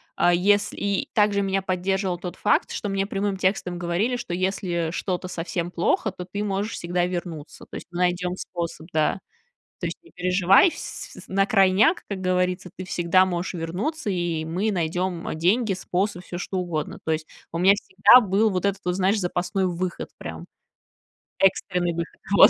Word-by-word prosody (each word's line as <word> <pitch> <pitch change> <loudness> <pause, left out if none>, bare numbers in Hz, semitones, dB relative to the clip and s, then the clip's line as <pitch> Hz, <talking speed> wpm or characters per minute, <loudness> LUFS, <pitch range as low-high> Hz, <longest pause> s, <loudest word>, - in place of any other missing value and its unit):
а, 175 - +4
если 200 +3 +3
и 200 -1 -1
также 205 -2 +3
меня 195 0 0
поддерживал 185 0 -1
тот 180 0 -6
факт, - - +1
что 205 - -3
мне 195 0 0
прямым 195 -1 -2
текстом 185 -2 0
говорили, 175 +8 0
что 180 -7 -5
если 180 -2 -1
что-то 185 0 -3
совсем 175 0 -3
плохо, 180 +4 +1
то 180 -1 -8
ты 205 +3 -4
можешь 200 +2 -1
всегда 175 +1 -1
вернуться. 175 -4 -6
То - - -9
есть - - -7
мы 175 - -6
найдём 180 0 +1
способ, 170 -2 -5
да. 155 +4 +1 0.6
"То - - -2
есть - - -5
не 345 - -20
переживай, 180 - +4
вс - - -8
на 195 +1 +2
крайняк, 200 - +4
как 195 -2 -4
говорится, 180 0 0
ты 185 - -6
всегда 180 +1 +3
можешь 180 0 -2
вернуться, 200 - -3
и 170 -4 -1
мы 190 +7 -1
найдём, 175 0 -1
э, - - -2
деньги, 195 +6 +2
способ, 185 0 -2
всё 175 - -6
что 190 +1 -4
угодно." 170 -4 -3
То 160 - -1
есть 155 0 -2 0.2
у 165 - -3
меня 190 +2 +6
всегда 200 +5 +6
был 205 +3 +3
вот 185 -1 -1
этот 200 0 0
вот, 180 0 0
знаешь, 195 +3 +2
запасной 180 +2 -1
выход, 180 0 -3
прям - - -7 0.9
экстренный 180 -2 +2
выход. 170 0 -5 0.2
Вот. - - +10
185 Hz, 180 wpm, -24 LUFS, 175-195 Hz, 0.9 s, Вот